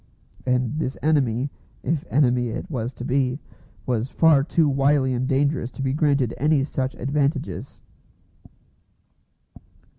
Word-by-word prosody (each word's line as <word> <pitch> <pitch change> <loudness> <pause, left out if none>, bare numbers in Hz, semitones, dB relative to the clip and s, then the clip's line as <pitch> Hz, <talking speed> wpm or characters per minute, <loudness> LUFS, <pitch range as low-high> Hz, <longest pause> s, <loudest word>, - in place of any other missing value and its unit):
And 125 +3 0
this 135 -4 -2
enemy, 135 -4 +1 0.3
if 160 -2 -1
enemy 125 -3 +2
it 110 - -6
was 120 -3 -2
to 125 - -7
be, 130 0 +1 0.5
was 125 0 -1
far 155 -3 +4
too 160 +1 +2
wily 135 -1 +2
and 125 +1 -1
dangerous 140 -2 +1
to 135 - -5
be 135 0 0
granted 140 -5 +1
any 150 0 +3
such 135 -2 -3
advantages. 140 +2 -2
135 Hz, 125 wpm, -23 LUFS, 125-145 Hz, 0.5 s, far